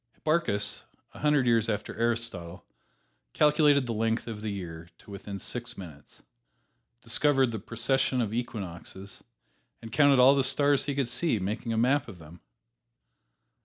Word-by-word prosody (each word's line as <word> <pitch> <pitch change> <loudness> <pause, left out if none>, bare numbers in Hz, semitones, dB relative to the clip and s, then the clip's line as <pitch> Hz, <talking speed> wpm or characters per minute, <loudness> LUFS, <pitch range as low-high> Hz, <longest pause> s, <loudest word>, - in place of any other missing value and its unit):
Hipparchus, 155 -11 0 0.3
a - - -12
hundred 150 -3 +2
years 115 -2 +2
after 105 -1 -3
Aristotle, 115 -7 -2 0.7
calculated 150 -2 +4
the 120 - -3
length 115 +1 -1
of 110 -3 -7
the 110 - -3
year 85 -4 -7
to - - -16
within 100 0 -7
six 120 +4 -5
minutes, 80 -7 -12 0.8
discovered 135 +2 +2
the 110 - -4
precession 125 +5 0
of 110 -3 -1
equinoxes 100 -4 -6 0.6
and 115 - -10
counted 140 +1 +4
all 130 +2 +7
the 140 -1 +2
stars 140 +1 +3
he 140 - -2
could 140 -3 0
see, 135 +1 0
making 105 +5 -3
a 115 - -1
map 130 +4 +2
of 100 -6 -10
them. 80 +2 -14
115 Hz, 150 wpm, -28 LUFS, 100-135 Hz, 0.8 s, all